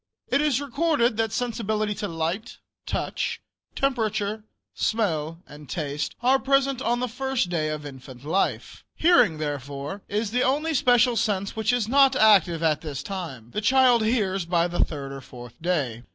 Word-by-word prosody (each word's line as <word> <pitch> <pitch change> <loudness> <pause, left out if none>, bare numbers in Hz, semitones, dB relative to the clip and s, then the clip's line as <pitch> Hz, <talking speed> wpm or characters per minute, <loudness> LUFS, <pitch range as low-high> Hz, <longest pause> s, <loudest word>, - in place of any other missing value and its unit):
It 275 +3 +2
is 295 -4 +2
recorded 285 -3 +1
that 225 -1 0
sensibility 220 -3 -1
to 205 +1 -4
light, 165 +6 -3 0.3
touch, - - -2 0.4
temperature, 220 -5 -1 0.3
smell 165 -8 -1
and 150 -1 -13
taste 150 -3 -3
are 265 +2 +4
present 275 -1 +1
on 240 -2 0
the 250 - -1
first 260 -4 -2
day 155 -3 -1
of 150 -1 -5
infant 130 -2 -11
life. 185 +6 -1
Hearing, 325 - +4
therefore, 145 +4 -5
is 210 +1 -2
the 250 +2 +1
only 295 +6 +1
special 245 -3 +4
sense 200 -2 -1
which 220 +1 +1
is 245 -4 0
not 270 +1 +5
active 180 -8 +4
at 155 -2 +2
this 145 -3 -5
time. 140 - -7
The 210 - -2
child 250 0 +4
hears 205 -5 0
by 170 0 +2
the 175 0 +1
third 140 -3 -5
or 135 0 -7
fourth 120 -1 -12
day. 145 -10 -1
205 Hz, 165 wpm, -25 LUFS, 155-245 Hz, 0.4 s, not